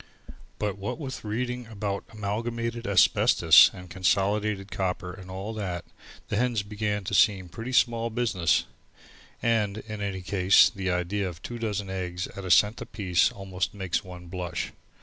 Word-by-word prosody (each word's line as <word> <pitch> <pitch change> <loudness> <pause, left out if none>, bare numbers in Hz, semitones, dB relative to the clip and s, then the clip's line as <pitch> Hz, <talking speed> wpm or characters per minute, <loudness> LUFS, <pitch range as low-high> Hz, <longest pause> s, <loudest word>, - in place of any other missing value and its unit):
But 105 -2 -2
what 100 - -4
with 135 -5 -6
reading 125 +2 -3
about 100 -2 -4
Amalgamated 115 +2 -3
Asbestos 95 -4 +6
and 90 0 -11
Consolidated 100 +2 0
Copper 90 -1 -2
and 95 0 -11
all 95 +4 -5
that, 95 -5 -4 0.4
the - - -1
hens 120 -3 +1
began 105 0 -2
to - - -5
seem 95 -4 +3
pretty 115 +8 -6
small 115 -2 +2
business, 105 -10 +1 0.8
and, 110 -3 +1
in 110 -1 -7
any 95 -2 -3
case, 95 +1 +5
the 95 -1 -3
idea 90 +2 -1
of 85 -1 -11
two 120 0 -6
dozen 105 -3 -3
eggs 90 -1 -3
at 100 - -7
a - - -4
cent 105 +4 +4
apiece 90 -5 +1
almost 95 -1 -4
makes 95 -2 -2
one 90 -2 -10
blush. 90 -1 -4
100 Hz, 155 wpm, -27 LUFS, 95-110 Hz, 0.8 s, Asbestos